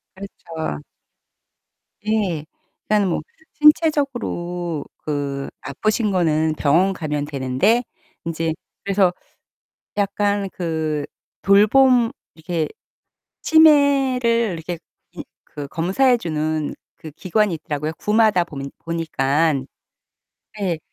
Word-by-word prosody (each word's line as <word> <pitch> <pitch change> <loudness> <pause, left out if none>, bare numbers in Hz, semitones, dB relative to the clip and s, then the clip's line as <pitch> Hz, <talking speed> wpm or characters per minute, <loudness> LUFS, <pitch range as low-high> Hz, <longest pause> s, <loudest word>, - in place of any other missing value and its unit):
그렇죠. 165 - -6 1.2
예. 200 -8 0 0.4
일단 210 -2 +2
뭐 170 - 0 0.3
신체적으로 245 - +1
그 140 -2 -3
아프신 215 - -1
거는 160 -4 +1
병원 170 +7 +3
가면 150 -5 -3
되는데 145 - +1 0.4
인제 165 -1 -2 0.3
그래서 195 -2 +3 0.8
약간 200 0 0
그 160 -4 -2 0.4
돌봄 230 +4 +5 0.2
이렇게 160 -1 -2 0.7
치매를 285 -5 +5 0.2
이렇게 170 +1 -5 0.4
음 - - -5 0.4
그 145 - -3
검사해 195 - +2
주는 155 -4 -2 0.2
그 155 - -10
기관이 195 +4 0
있더라고요. 150 -1 -4
구마다 210 -4 +3
보면 140 -4 -7
보니깐. 155 -3 0 0.9
네. 185 -6 -1
175 Hz, 200 characters per minute, -21 LUFS, 155-215 Hz, 1.2 s, 돌봄